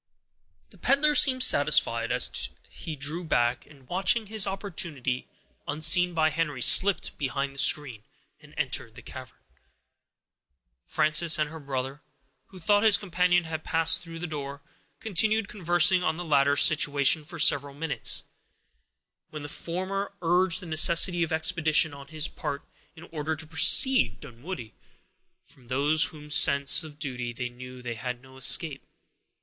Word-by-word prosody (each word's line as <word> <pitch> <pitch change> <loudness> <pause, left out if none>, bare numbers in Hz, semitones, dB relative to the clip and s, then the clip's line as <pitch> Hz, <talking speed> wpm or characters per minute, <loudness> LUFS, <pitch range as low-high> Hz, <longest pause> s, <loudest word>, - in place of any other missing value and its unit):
The 195 - -18
peddler 280 - +2
seemed 255 -3 +4
satisfied; - - +2
for - - -1 0.2
he 160 -3 -8
drew 150 +5 -4
back, 120 -6 -1
and, 135 -4 -20
watching 195 +5 0
his 215 -1 +1
opportunity, 165 - -4 0.4
unseen 175 +4 +2
by 155 -1 +1
Henry, 150 -6 -3
slipped 200 0 +3
behind 140 -1 -4
the 140 - -8
screen, 135 -7 +2 0.4
and - - -19
entered - - -3
the - - -13
cavern. - - -12 1.5
Frances 155 - +2
and 155 -1 -2
her 160 - -10
brother, 135 0 -6 0.5
who 190 - -16
thought 205 +4 +1
his 220 -2 +4
companion 180 -2 0
had 160 -1 -7
passed 165 0 +2
through 165 -1 -11
the 170 - -6
door, 145 -2 -8 0.4
continued 220 +1 0
conversing 175 -1 +2
on 160 -3 -2
the 175 - -7
latter's 145 -2 +3
situation 145 0 +2
for 175 +4 -10
several 145 -3 +2
minutes, 155 0 -1 1.1
when 150 -1 -9
the 145 - -8
former 190 +6 -5
urged 175 +1 +1
the - - -9
necessity 170 +2 +3
of 165 - -2
expedition 160 -1 +1
on 140 0 -12
his 155 0 -3
part, 145 -2 -7 0.3
in 165 - -14
order 160 0 -4
to 160 +1 -10
precede 160 - +3
Dunwoodie, 125 -2 -10 0.7
from 125 -3 -18
whose 150 +2 -1
sense 140 +1 +4
of 150 -2 -12
duty 125 -5 -6
they 125 +1 -6
knew 125 +1 -12
they 120 -1 -5
had 125 +2 -7
no 130 +1 -19
escape. 135 +3 +1
155 Hz, 145 wpm, -25 LUFS, 140-175 Hz, 1.5 s, seemed